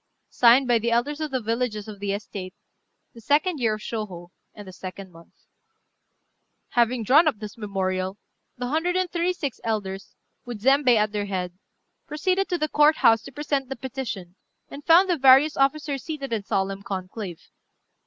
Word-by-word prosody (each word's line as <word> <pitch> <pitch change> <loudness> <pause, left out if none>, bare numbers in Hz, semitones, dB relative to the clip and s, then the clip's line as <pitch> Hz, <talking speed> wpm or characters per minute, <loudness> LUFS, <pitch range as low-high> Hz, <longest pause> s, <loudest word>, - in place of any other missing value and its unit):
"Signed 250 +2 +5
by 240 -2 +3
the 235 +2 -1
elders 270 +6 0
of 310 - -2
the 260 -2 -1
villages 225 -2 -2
of 210 -2 -9
the 200 0 -2
estate, 195 -2 -6 0.6
the 230 - -13
2d 300 - +1
year 225 -3 +1
of 215 - -11
Shôhô, 190 -7 -6 0.3
and 205 -2 -11
the - - -8
2d 185 +1 -9
month." 165 0 -18 1.3
Having 240 0 +1
drawn 295 +9 +5
up 290 - +1
this 210 -1 -8
memorial, 190 -2 -3 0.4
the 245 0 -4
hundred 325 +5 0
and 370 -1 0
thirty 345 +1 0
six 285 -8 -5
elders, 200 -4 -4 0.3
with 240 -3 -7
Zembei 270 -1 +4
at 210 -1 +1
their 205 -1 -2
head, 180 -2 -3 0.5
proceeded 370 +5 0
to 355 - 0
the 310 - -1
Court 300 +1 +4
house 225 -1 +4
to 275 - -11
present 280 -1 -2
the 270 - -4
petition, 235 -9 -6 0.4
and 285 +1 -9
found 345 +3 +6
the 355 -2 +1
various 270 +3 +6
officers 275 0 0
seated 275 -6 -5
in 220 - -1
solemn 195 0 -2
conclave. 190 -2 -7
235 Hz, 175 wpm, -24 LUFS, 200-290 Hz, 1.3 s, found